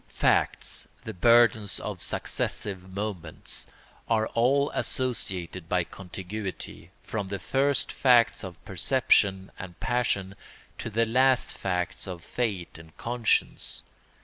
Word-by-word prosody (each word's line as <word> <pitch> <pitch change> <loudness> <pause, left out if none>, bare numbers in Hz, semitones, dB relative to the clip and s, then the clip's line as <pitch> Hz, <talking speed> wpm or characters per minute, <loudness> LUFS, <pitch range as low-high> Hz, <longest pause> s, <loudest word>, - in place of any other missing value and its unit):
Facts—the 110 - 0
burdens 110 +1 +4
of - - -5
successive 95 -3 -2
moments—are 100 +3 -3
all 135 +5 +2
associated 95 - -2
by 90 -1 +2
contiguity, 95 0 -7
from 105 -3 -3
the 100 +1 -3
first 135 +8 +1
facts 120 -3 +4
of 90 -3 -9
perception 95 -2 +2
and 90 -2 -9
passion 100 -6 0 0.5
to - - -4
the 115 +2 +2
last 130 +3 +3
facts 90 0 -2
of 90 -2 -6
fate 100 -9 -3
and 80 -1 -15
conscience. 120 -1 0
100 Hz, 105 wpm, -27 LUFS, 90-120 Hz, 0.5 s, burdens